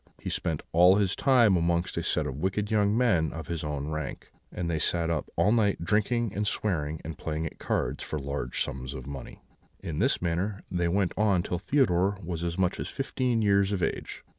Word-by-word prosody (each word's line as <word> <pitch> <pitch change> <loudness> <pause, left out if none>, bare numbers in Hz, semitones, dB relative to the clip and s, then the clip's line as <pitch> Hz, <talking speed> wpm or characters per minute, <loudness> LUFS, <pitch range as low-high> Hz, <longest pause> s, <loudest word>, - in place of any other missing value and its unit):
He - - -4
spent 80 -3 -2
all 90 +3 +6
his 100 -2 +2
time 120 -8 +5
amongst 85 +1 0
a - - -1
set 75 - 0
of 70 -2 -4
wicked 100 +4 -1
young 105 0 +3
men 90 -11 +2
of 80 -1 -6
his 85 -1 -3
own 75 -1 -3
rank; 75 -3 -5 0.2
they 85 -3 -2
sat 85 +1 0
up 75 -4 -2
all 105 - +3
night 105 -6 +2
drinking 110 +2 +1
and 105 +1 -1
swearing 80 -8 -1
and 80 0 -6
playing 80 0 -3
at 80 - -7
cards - - -1
for 75 - -3
large 70 -3 -2
sums 65 +1 -5
of 65 -2 -7
money. 70 -2 -8 0.4
"In 80 -3 -5
this - - +2
manner 90 +4 -2
they 90 -2 +1
went 95 +1 +1
on 100 -4 +3
till 90 - -2
Theodore 100 -5 +2
was 85 -1 -4
as 85 0 -2
much 95 -1 +1
as - - -3
fifteen 125 -4 -1
years 100 -1 +3
of 95 -3 -1
age. - - -3
90 Hz, 205 wpm, -28 LUFS, 80-105 Hz, 0.4 s, all